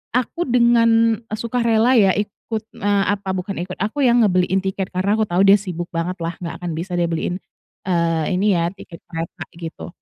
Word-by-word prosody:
aku 255 +8 -1
dengan 230 -2 +4 0.2
sukarela 235 +1 +1
ya 195 -4 +5
ikut, 210 +2 -4
eee, 200 0 +1
apa 200 -1 -5
bukan 190 +1 -4
ikut, 185 - -7
aku 215 +8 -2
ya 240 - +4
ngebeliin 190 -4 +3
tiket 190 -1 -2
karena 190 +3 +1
aku 215 - +1
tau 180 0 +1
dia 195 +1 +8
sibuk 175 -3 -5
banget 170 +3 -2
lah 165 +1 -2
nggak 170 -2 -5
akan 175 - -2
bisa 175 +2 -4
dia 175 -1 +1
beliin, 165 +2 -2 0.5
eee, 170 -2 +1
ini 200 -1 +3
ya, 170 0 +1
tiket 175 -4 -12
kereta 165 0 -5
gitu. 165 -1 -7
195 Hz, 185 wpm, -20 LUFS, 175-220 Hz, 0.5 s, dia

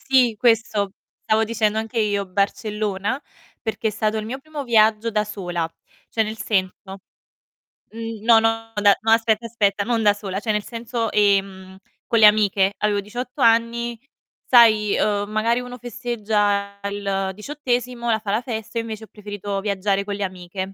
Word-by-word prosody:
Sì, 255 -4 +3
questo 225 -4 +2 0.3
stavo 220 +1 +2
dicendo 220 -1 0
anche 225 +1 -2
io 205 -2 0
Barcellona, 205 +4 -2 0.4
perché 220 0 -2
è - - +2
stato 215 +1 -1
il 215 - -3
mio 250 +4 -4
primo 305 0 -7
viaggio 225 -2 +3
da 210 -1 +1
sola. 175 -5 -3 0.4
Cioè 225 - +1
nel 215 +1 -5
senso 190 -2 -2 0.9
mh, 225 -1 -7
no, 225 -1 +6
no, 225 0 -1
da 205 -1 +5
no 225 0 +1
aspetta, 225 0 +3
aspetta, 205 -3 0
non 230 0 0
da 205 -1 +5
sola, 200 -2 -5
cioè 215 0 -1
nel 210 - -1
senso, 230 -1 -3
ehm, 195 -2 +1 0.3
con 230 - +2
le 215 - +8
amiche. 205 -2 +4
Avevo 205 -1 0
18 245 +6 -6
anni, 235 0 +2 0.5
sai, 220 -4 +5
uhm, 205 -1 0
magari 230 +3 +1
uno 250 0 -7
festeggia 210 -4 -1
il 200 -1 -2
diciottesimo, 245 0 -3
la 220 - +2
fa 210 -2 -4
la 215 - +1
festa, 230 -2 -5
io 230 - 0
invece 220 -1 -7
ho - - -25
preferito 205 -1 -5
viaggiare 200 -1 0
con 205 -1 -3
le 205 - -3
amiche. 185 +1 -5
215 Hz, 170 wpm, -22 LUFS, 200-230 Hz, 0.9 s, le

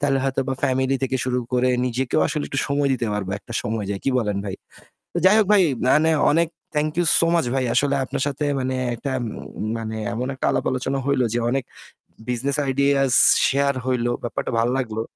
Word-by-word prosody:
তাহলে 140 -1 +1
হয়তোবা 135 0 -1
family 130 0 +1
থেকে 130 0 0
শুরু 125 -1 0
করে 125 0 +2 0.2
নিজেকেও 125 +1 0
আসলে 150 0 -2
একটু 135 - -3
সময় 140 0 +1
দিতে 120 -3 -1
পারব 100 -2 -3
একটা 115 - -12
সময় 110 -1 -3
যায়, 100 -1 -3
কি 135 - +2
বলেন 105 -4 -1
ভাই? 95 -2 -4 0.6
তো - - -3
যাই 190 +3 +7
হোক 210 - +2
ভাই 195 - +6 0.3
মানে 160 +2 +4 0.2
অনেক 170 +2 +2 0.3
thank 150 +1 +1
you 175 - +2
so - - +4
much 165 -7 +1
ভাই। 130 -1 0
আসলে 140 0 +2
আপনার 135 +1 -3
সাথে 145 +1 -2
মানে 130 0 -2 0.2
একটা 135 +4 -5 0.5
উম 110 - -2
মানে 110 -1 -5 0.2
এমন 125 +2 -3
একটা 130 - -3
আলাপ - - -1
আলোচনা 130 +1 -2
হইল 140 -2 +2
যে 120 - +1
অনেক 135 +1 0 0.7
business 125 +3 -1 0.2
ideas 140 0 +2 0.4
share 140 0 +1
হইল। 125 -2 0 0.2
ব্যাপারটা 120 - -3
ভাল্লাগলো। 115 -2 -1
130 Hz, 195 wpm, -22 LUFS, 120-140 Hz, 0.7 s, যাই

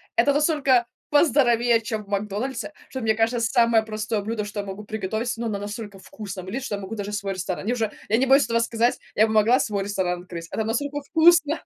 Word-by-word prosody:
это 285 - +4
настолько 285 -5 +3 0.3
поздоровее, 240 -6 +4
чем 220 -1 -4
в - - -22
"Макдональдсе", 210 +9 -3 0.2
что, 260 - -5
мне 220 -1 +1
кажется, 225 +2 +1
самое 230 -1 +3
простое 215 0 -3
блюдо, 215 0 -3
что 205 0 -6
я 200 - -3
могу 195 +2 -7
приготовить, 220 +3 -3
но 230 0 -3
оно 205 -2 -2
настолько 205 0 -7
вкусное 195 -2 -8
будет, 235 +8 -5
что 215 -6 -3
я 200 - -7
могу 195 +3 -7
даже 205 0 -5
свой 200 -2 -2
ресторан 185 0 -4
Мне 235 +4 0
уже 225 -3 -1 0.2
я 220 - +3
не 265 +1 +1
боюсь 270 0 +5
этого 230 0 +1
сказать, 230 +1 +1 0.2
я 215 - +5
бы 220 - -2
могла 225 +4 +4
свой 200 -2 -1
ресторан 180 -3 -2
открыть, 170 -2 -8
оно 220 - -2
настолько 285 +6 -2
вкусно! 320 0 +4
220 Hz, 220 wpm, -24 LUFS, 205-245 Hz, 0.3 s, боюсь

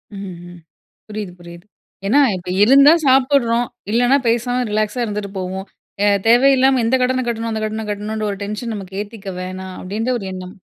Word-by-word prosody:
ம், 195 -2 -7 0.2
ம். 175 - -13 0.5
புரியுது, 210 -4 -6
புரியுது. 170 +1 -12 0.4
ஏன்னா, 260 +8 +4 0.2
இப்ப 180 0 -9
இருந்தா, 275 +6 +7
சாப்பிடுறோம். 255 -3 +3 0.2
இல்லனா, 245 +4 +4
பேசாம 245 +2 +1
ரிலாக்ஸா 215 +3 -1
இருந்துட்டு 205 -2 -4
போவோம். 190 +1 -4 0.4
அ - - +4 0.2
தேவையில்லாம 265 +2 +5
இந்த 240 +3 +2
கடன 255 +1 +1
கட்டணும், 230 -1 -2
அந்த 220 0 -3
கடன 215 0 -4
கட்டணுன்ற 210 +1 -3
ஒரு 200 - -5
டென்ஷன் 210 +3 -4
நமக்கு 190 -1 -8
ஏத்திக்க 205 -1 -8
வேணாம், 185 0 -7
அப்படின்ற 215 +6 -3
ஒரு 200 - -7
எண்ணம். 185 +1 -8
215 Hz, 160 wpm, -19 LUFS, 195-245 Hz, 0.5 s, இருந்தா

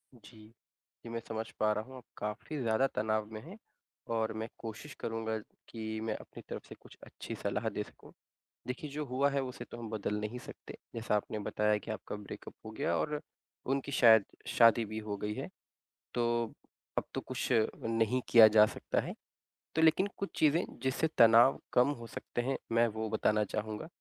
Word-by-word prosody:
जी। 115 -1 -16 0.7
जी, 115 - -8
मैं 115 0 -3
समझ 110 0 -3
पा 110 0 +4
रहा 105 - -2
हूँ, 130 +3 -11
आप 125 - -11
काफ़ी 105 +8 -4
ज़्यादा 115 +3 +3
तनाव 110 0 +1
में 110 - -6
हैं, 180 +8 -11 0.5
और 110 -1 0
मैं 110 +1 -3
कोशिश 115 +6 -7
करूँगा 110 -1 -2 0.3
कि 110 -1 -4
मैं 110 -1 -1
अपनी - - -10
तरफ़ - - -6
से - - -8
कुछ - - -16
अच्छी - - -7
सलाह - - -1
दे - - -3
सकूँ। - - -16 0.6
देखिए 130 +4 -4
जो 150 +1 -3
हुआ 135 +2 +2
है, 140 -1 0
उसे 125 -1 -6
तो 120 - -7
हम 115 - -6
बदल 105 -1 -2
नहीं 105 +4 -4
सकते। - - -10 0.2
जैसा 115 -2 -1
आपने 105 +1 -2
बताया 105 0 +1
कि 110 - -8
आपका 110 -1 -5
ब्रेकअप 105 -1 -9
हो - - -5
गया 100 -5 -1
और 150 - -1 0.5
उनकी 140 +1 -1
शायद 110 -5 +7 0.2
शादी 115 0 +6
भी 110 +1 -5
हो 105 -2 -4
गई 105 +1 -3
है। - - -4 0.7
तो, 120 -1 +1 0.5
अब - - -1
तो - - -1
कुछ 130 -1 -3 0.4
नहीं 115 +2 +2
किया 115 -2 +10
जा 105 0 +7
सकता - - -1
है। - - -5 0.6
तो 160 - +3
लेकिन 160 +5 +5
कुछ 200 - -3
चीज़ें 155 +3 +4 0.2
जिससे 130 +4 +1
तनाव 115 +3 +7
कम 125 +3 +5
हो 115 - -8
सकते 120 - -4
हैं, 135 +2 -1
मैं 115 +1 +4
वो 110 0 -3
बताना 105 0 +2
चाहूँगा। 105 +6 -4
115 Hz, 190 wpm, -33 LUFS, 110-130 Hz, 0.7 s, किया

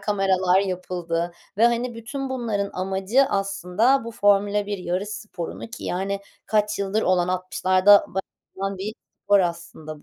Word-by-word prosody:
kameralar 190 -2 +2
yapıldı 175 -2 -3 0.3
ve, 230 - +5
hani, 240 +1 0
bütün 265 +4 -5
bunların 220 -6 -2
amacı, 190 +8 +1
aslında, 200 +3 +1
bu 230 - -5
Formula 205 0 +2
1 205 -1 -3
yarış 180 +3 -2
sporunu 210 -5 -6
ki, 240 - -8
yani 195 +2 -2 0.3
kaç 210 -1 +1
yıldır 200 +2 0
olan, 180 -1 +2
60'larda 185 +2 +4
başlayan 195 +1 -6
bir 205 +3 -4 0.3
spor 200 0 +5
aslında 170 -3 -5
195 Hz, 140 wpm, -24 LUFS, 185-210 Hz, 0.3 s, ve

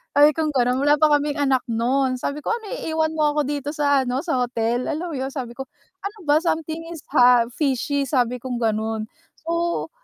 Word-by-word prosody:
sabi 290 +1 +7
kong 310 +1 -1
gano'n 250 -1 +2
wala 290 +2 +4
pa 305 0 +4
kaming 290 0 -2
anak 270 -2 +2
nun. 255 +3 +1
Sabi 285 +1 -3
ko, - - -1
"Ano 450 -3 -5
iiwan 320 -9 -1
mo 300 -1 +2
ako 300 - +3
dito 290 -1 -3
sa 285 -3 +2
ano, 255 +2 -1
sa 320 -7 0
hotel?" 240 0 -1
Alam 340 +4 -4
mo - - -4
yon, 260 +1 -2
sabi 255 -5 -5
ko, 270 - -5 0.4
"Ano 410 +2 -5
ba, 295 - +6
something 320 -1 -2
is 325 - -9
ha 245 -1 +6
fishy," 280 0 0
sabi 250 -2 +1
kong 250 0 -4
gano'n. 220 0 -1 0.4
So, 335 +1 -1
280 Hz, 205 wpm, -22 LUFS, 250-310 Hz, 0.4 s, sabi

